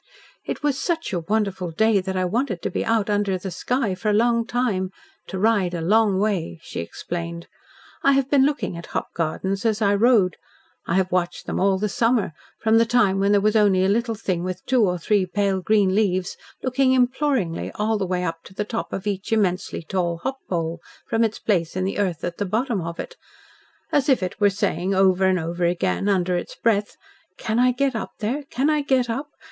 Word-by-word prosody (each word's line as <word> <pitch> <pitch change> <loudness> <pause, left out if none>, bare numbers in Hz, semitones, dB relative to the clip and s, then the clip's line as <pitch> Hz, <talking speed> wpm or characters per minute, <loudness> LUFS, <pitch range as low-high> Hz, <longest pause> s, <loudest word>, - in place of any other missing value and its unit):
"It - - -5
was 285 -2 +1
such 330 - -2
a 175 - 0
wonderful 190 0 -1
day 210 +4 +2
that 190 0 -3
I 185 - +1
wanted 205 -2 -1
to - - -2
be - - -1
out 225 -2 +1
under 205 -2 +1
the 185 +1 -6
sky 240 +3 -1
for 200 +4 -2
a - - +3
long 230 +1 +2
time 230 -7 0 0.4
to 190 - -5
ride 195 -3 +2
a - - -2
long 205 +2 +3
way," 190 - -1
she - - -6
explained. 170 - -5 0.6
"I 275 - +4
have 270 -1 +2
been 275 -1 +4
looking 285 -9 0
at 170 0 -8
hop - - -5
gardens 190 +4 -2
as 220 -2 +1
I 205 -2 +3
rode. 205 -3 +3 0.5
I 170 - 0
have 190 -1 +1
watched 180 -1 -1
them - - -2
all 195 0 +3
the 210 +2 -1
summer 230 -3 +1 0.3
from 220 0 +4
the 230 - +4
time 215 -5 +3
when 200 +1 +2
there 205 - +5
was 215 +2 +2
only 200 -3 +4
a - - +2
little 230 +2 +1
thing 185 -5 -2
with 185 0 -5
two 250 -3 +3
or 180 -1 0
three 190 +2 +1
pale 195 0 0
green 200 -1 +3
leaves 185 -3 +1 0.3
looking 260 0 +2
imploringly 255 - +1
all 215 0 0
the 190 - -1
way 180 0 -1
up 165 -2 -3
to 190 - -14
the 210 - -2
top 230 +2 -4
of 195 - -4
each 200 0 -3
immensely 190 -6 0
tall 170 0 -1
hop 265 0 -3
pole, 170 -1 -2 0.3
from 225 0 +1
its 225 -1 0
place 175 -6 0
in 185 - -1
the 195 +2 -2
earth 180 -5 -1
at 175 -1 -4
the 205 - 0
bottom 220 +1 0
of 170 0 -6
it - - -7 0.7
as 290 0 +2
if 260 -8 +3
it 185 +3 -5
was 200 -1 +3
saying 190 -1 0
over 190 0 +4
and 185 -1 +3
over 170 +2 -3
again, 180 +3 0
under 185 -2 +1
its 175 - -4
breath, 210 -3 0 0.4
'Can 220 +1 -1
I 250 0 +5
get 265 0 0
up 225 - -4
there? 240 +7 -2
Can 265 +4 0
I 305 -1 +2
get 265 -3 +1
up? 270 +6 -3
200 Hz, 220 wpm, -23 LUFS, 185-230 Hz, 0.7 s, there